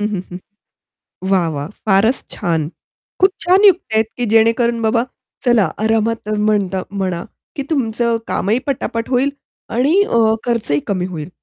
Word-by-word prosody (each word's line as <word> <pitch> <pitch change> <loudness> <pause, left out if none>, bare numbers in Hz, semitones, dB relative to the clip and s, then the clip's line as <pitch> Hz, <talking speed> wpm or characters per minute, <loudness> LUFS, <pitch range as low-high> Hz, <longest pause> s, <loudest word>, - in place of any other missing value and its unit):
हं, 210 - +1
हं, 190 - -1
हं. 180 - -6 0.9
वाह! 180 -3 +3
वाह! 145 +2 -4 0.2
फारच 210 +6 +3
छान. 165 -6 -1 0.5
खूप 380 +1 +6 0.2
छान 375 +3 +4
युक्त्या 335 - +2
आहेत, 220 - +3
की 245 - -1
जेणेकरून 230 +1 +3
बाबा 230 +2 +2 0.4
चला 230 -7 +4 0.2
आरामात 225 -1 0 0.2
म्हणता 195 -3 0 0.2
म्हणा, 175 -2 -2 0.3
की 280 - -3
तुमचं 235 -5 0
कामही 220 +6 0
पटापट 230 -3 -2
होईल 265 +2 +2 0.5
आणि 310 +10 +4
अ, 235 - +1 0.2
खर्चही 220 -12 0
कमी 185 -2 -1
होईल. 155 +2 -6
225 Hz, 145 wpm, -18 LUFS, 190-245 Hz, 0.9 s, खूप